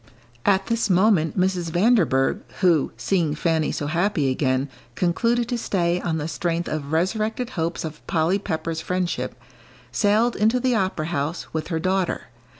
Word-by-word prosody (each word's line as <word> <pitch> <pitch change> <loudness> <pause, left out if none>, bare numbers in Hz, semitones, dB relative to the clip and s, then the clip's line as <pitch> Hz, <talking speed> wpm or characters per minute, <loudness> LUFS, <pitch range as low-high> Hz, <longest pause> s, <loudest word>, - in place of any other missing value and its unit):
At 195 -1 +3
this 230 -2 0
moment 185 -3 +3
Mrs. 180 -2 +1
Vanderburgh, 175 - +3 0.2
who, 170 -6 +3
seeing 155 +4 0
Fanny 160 -1 +1
so 145 - -3
happy 165 -3 +1
again, 130 0 0 0.3
concluded 230 +7 +1
to 245 -2 -1
stay 175 -4 0
on 165 -2 -1
the 150 0 -3
strength 170 +2 -2
of 150 -2 -4
resurrected 215 +8 0
hopes 165 -4 -2
of 155 -1 -9
Polly 170 +4 +1
Pepper's 165 -3 -3
friendship, 180 0 -2 0.5
sailed 220 +3 +2
into 220 +4 +2
the 255 0 +1
opera 190 -7 0
house, 155 0 -3
with 160 -1 -2
her 165 - -1
daughter. 185 +2 -1
175 Hz, 155 wpm, -23 LUFS, 160-205 Hz, 0.5 s, At